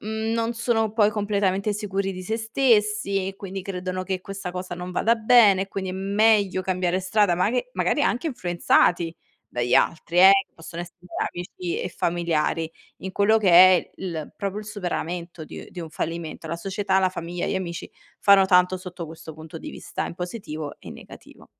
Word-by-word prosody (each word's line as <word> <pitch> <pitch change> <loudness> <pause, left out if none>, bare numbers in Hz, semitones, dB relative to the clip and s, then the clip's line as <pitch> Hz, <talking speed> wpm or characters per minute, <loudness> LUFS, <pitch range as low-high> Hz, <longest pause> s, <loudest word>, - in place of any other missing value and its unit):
mhmm, 220 +1 -3
non 230 0 0
sono 230 -2 0
poi 215 -2 +4
completamente 205 -1 0
sicuri 195 -2 -2
di 185 0 -7
sé 220 +5 -2
stessi 215 -4 +1
e 195 - -7
quindi 195 -1 -7
credono 185 -1 -4
che 185 0 -3
questa 195 -1 -6
cosa 180 0 -5
non 180 +1 -6
vada 225 +5 +2
bene, 220 -4 +5
e 195 - -7
quindi 190 -1 -4
è - - -5
meglio 200 0 +2
cambiare 185 0 0
strada, 190 -1 +2
ma 180 +3 +1
che 255 - -2
magari - - +1
anche 250 +6 0
influenzati 175 - +1 0.3
dagli 120 0 0
altri, 170 +1 +1
eh, 190 +1 +9 0.2
possono 165 +1 -7
essere 175 0 -13 0.3
amici 360 - -5
e - - -3
familiari 165 -1 -1 0.3
in 190 0 -6
quello 215 +3 +3
che 210 -3 +1
è 185 +1 +7
il 165 -5 -6
proprio 200 0 -3
il 210 - -7
superamento 175 -4 -4
di - - -10
uhm, - - -11
di 180 - -8
un 165 - -6
fallimento. 165 +1 -5
La 165 +1 -3
società, 195 +2 0
la 190 -1 +3
famiglia, 175 -1 -4
gli - - -1
amici 175 -3 -4 0.3
fanno 200 -1 +6
tanto 180 -1 +4
sotto 180 -2 -8
questo 160 0 -10
punto 160 +1 -10
di - - -7
vista - - -5
in - - -6
positivo 170 -5 -6
e - - -10
negativo. - - -13
190 Hz, 185 wpm, -24 LUFS, 175-210 Hz, 0.3 s, eh